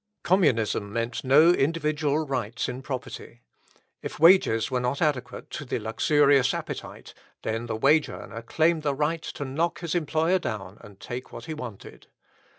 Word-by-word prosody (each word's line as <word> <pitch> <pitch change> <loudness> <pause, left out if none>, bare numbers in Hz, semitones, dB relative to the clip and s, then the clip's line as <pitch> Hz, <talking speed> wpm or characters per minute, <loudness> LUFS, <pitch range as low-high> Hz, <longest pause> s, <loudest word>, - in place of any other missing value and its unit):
Communism 115 - +2
meant 115 +2 -3
no 150 +6 +6
individual 155 -1 0
rights 125 -4 -2
in 125 +1 -5
property. 130 -2 -7 0.6
If - - -7
wages 160 - +5
were 125 - +1
not 125 +3 -1
adequate 145 -6 -2
to - - -5
the 130 - -3
luxurious 135 +4 +3
appetite, - - -7 0.3
then 115 +2 -3
the 115 - -2
wage 145 +7 +3
earner 95 +5 -8
claimed 160 +7 +1
the 145 -2 -1
right 155 +3 -1
to 145 - -6
knock 160 +6 -2
his 170 -3 -3
employer 165 +2 +1
down 100 - -6
and 100 -2 -14
take 125 +1 -7
what - - -9
he 160 - -5
wanted. 125 -10 -9
135 Hz, 155 wpm, -26 LUFS, 115-155 Hz, 0.6 s, no